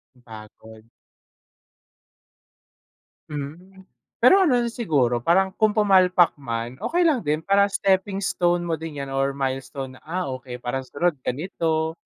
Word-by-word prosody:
Napagod. 110 -1 -14 2.4
Hmm. 170 +7 -8 0.4
Pero 390 - +7
ano 310 -10 +3
rin 235 - -2
siguro, 140 - 0
parang 190 +8 +2
kung 215 0 +3
pumpalpak 185 -4 +4
man, 115 -1 -5
okey 350 +1 0
lang 305 -7 +3
din. 155 0 -1
Parang 200 0 +3
stepping 195 0 0
stone 175 -1 +1
mo 165 -2 -2
din 150 -4 -6
'yan 135 - -7
or 135 0 0
milestone 130 -1 -4
na, - - -40
"Ah, 180 +3 -3
okey. 130 -1 -7
Para 125 +2 -2
sa 130 - -18
sunod, 165 -3 0
ganito." 160 +3 -2
160 Hz, 140 wpm, -23 LUFS, 130-190 Hz, 2.4 s, Pero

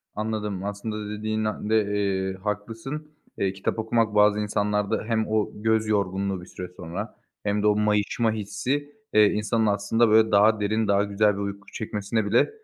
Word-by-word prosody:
Anladım, 105 -3 -3
aslında 100 +2 -4
da - - -6
dediğin 110 +1 -2 0.2
de, 110 0 +4
eee, 95 -2 0
haklısın. 115 +9 -4 0.3
Eee, 95 -1 0
kitap 95 +3 -2
okumak 110 -1 +1
bazı 105 0 +5
insanlarda 105 -1 0
hem 110 -2 0
o 110 -1 +1
göz 110 0 +1
yorgunluğu 100 -2 0
bir - - -11
süre 90 -1 -7
sonra 90 +6 -6 0.3
hem 105 0 0
de 105 - +4
o 105 - +4
mayışma 105 +2 +1
hissi, 110 +8 -3 0.2
eee, 105 0 +7
insanın 105 +2 0
aslında, 105 +3 +2
böyle, 110 +1 +5
daha 105 +2 +5
derin, 105 +1 0
daha 100 0 +3
güzel 105 +1 +2
bir 100 - -5
uyku 100 0 -5
çekmesine 105 0 -2
bile 105 - +3
105 Hz, 170 wpm, -25 LUFS, 100-110 Hz, 0.3 s, eee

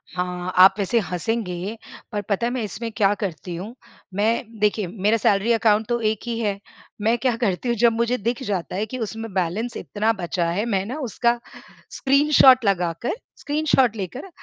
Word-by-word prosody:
हाँ, 180 0 -3
आप 190 +1 +9
वैसे 215 +4 +2
हँसेंगे 190 +1 -3 0.3
पर 210 - -2
पता 205 +3 +1
है - - -2
मैं 255 -3 -2
इसमें 230 +2 -5
क्या 205 -2 +4
करती 175 -1 -4
हूँ? 205 +8 -7 0.4
मैं 225 +2 -1
देखिए 210 -2 +1
मेरा 210 +4 +1
सैलरी 205 +1 +2
अकाउंट 220 -1 +2
तो 240 0 +1
एक 215 -1 0
ही 230 -1 -2
है। 205 -3 -1 0.4
मैं 225 +3 +2
क्या 250 -1 0
करती 230 +1 -1
हूँ, 235 - +2
जब 235 +2 +5
मुझे 235 +2 0
दिख 235 +3 -2
जाता 190 -7 -3
है 205 +3 -1
कि 255 +4 -6
उसमें 225 -1 -5
बैलेंस 190 +6 -1
इतना 215 +2 0
बचा 175 -3 -2
है, 200 +6 -1
मैं 195 -5 0
ना 250 +8 -5
उसका 240 -1 0 0.5
स्क्रीनशॉट 275 -3 +5
लगाकर 180 - 0 0.2
स्क्रीनशॉट 290 -6 +1
लेकर 220 - -6
220 Hz, 180 wpm, -23 LUFS, 195-235 Hz, 0.5 s, आप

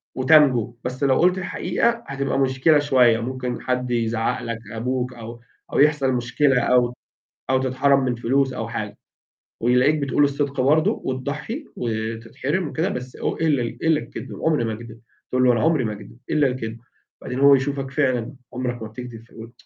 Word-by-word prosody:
وتنجو. 130 -4 +4
بس 130 +3 -4
لو 135 -1 +3
قُلت 180 +2 +3
الحقيقة 230 +5 -1
هتبقى 135 0 -2
مشكلة 135 +3 +3
شوية، 125 -5 +4
ممكن 125 +1 -4
حد 125 -1 -2
يزعّق 115 -1 0
لك؛ 115 -1 -4
أبوك، 125 +2 -2
أو 115 0 -9 0.3
أو - - +1
يحصل 145 -2 +3
مشكلة 125 +2 +2
أو 125 0 +2 0.6
أو 130 - +4
تتحرم 135 +2 +2
من 125 -1 0
فلوس 130 +3 +1
أو 115 - -4
حاجة، 110 -3 -5 0.6
ويلاقيك 125 +6 +3
بتقول 145 0 +1
الصدق 140 -1 0
برضه، 150 +4 +2
وتضّحي 145 - -4
وتتحرم 115 +8 -3
وكده 160 +6 -1
بس 125 -3 -6
إو - - -2
إلّا 155 -5 +1
إلّا 155 +6 0
الكدب، - - -8
عمري 155 -7 +2
ما 110 -1 -2
أكدب. 115 0 -10 0.3
تقول 130 0 +2
له: 125 - +6
"أنا 115 -2 +1
عمري 160 -5 +2
ما 110 -2 -2
أكدب، 105 +2 -12
إلّا 150 -2 +3
الكدب". 115 -3 -4 0.4
بعدين 125 +1 -4
هو 140 0 +7
يشوفك 135 0 -2
فعلًا 130 -3 0 0.2
عمرك 125 -2 -3
ما 110 - -5
بتكدب 120 0 -9
فيقول: 115 0 -12
130 Hz, 170 wpm, -22 LUFS, 120-140 Hz, 0.6 s, هو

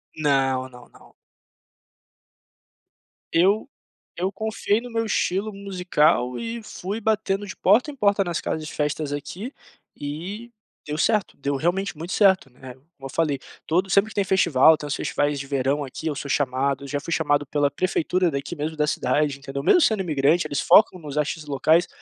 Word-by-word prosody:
Não, 135 -3 +1
não, 125 -1 -15
não. - - -20 2.2
Eu 200 +9 +3 0.5
eu 190 +2 0
confiei 220 +1 -1
no 245 - -9
meu 225 -1 -1
estilo 205 0 -1
musical 180 -10 +1
e 230 0 -4
fui 200 +2 -5
batendo 205 -2 0
de 190 - -8
porta 230 +10 +3
em - - -12
porta 200 -4 +2
nas 175 -3 -3
casas 155 -1 -3
de - - -8
festas 150 0 -2
aqui 190 - -6 0.4
e 180 +11 -6 0.3
deu 150 +1 -4
certo, 210 +4 +1
deu 140 0 -2
realmente 175 +4 -1
muito 170 +5 -6
certo, 190 -9 +4
né. 125 0 -11
Como 135 +6 -27 0.2
eu - - -11
falei, 155 -4 +1 0.3
todo 185 +4 +1
sempre 200 +2 +4
que - - -13
tem 200 - +2
festival, 160 -5 +5
tem 150 - -7
uns 140 - -2
festivais 145 0 -1
de 140 - -5
verão 140 +1 0
aqui 140 +4 -6
eu 150 - -1
sou 140 - -6
chamado, 140 0 0
já 145 +1 -2
fui 165 +3 -4
chamado 145 -2 +1
pela 145 0 +1
prefeitura 180 +2 0
daqui 140 +5 -4
mesmo 155 +1 -4
da 150 0 +1
cidade, 145 +1 0
entendeu. 140 0 -6
Mesmo 350 - +5
sendo 220 -8 +3
imigrante, 155 0 +2
eles 145 - -2
focam 195 -3 +5
nos 150 -3 -8
artistas 150 +1 -1
locais, 160 +5 +3
160 Hz, 175 wpm, -24 LUFS, 145-195 Hz, 2.2 s, festival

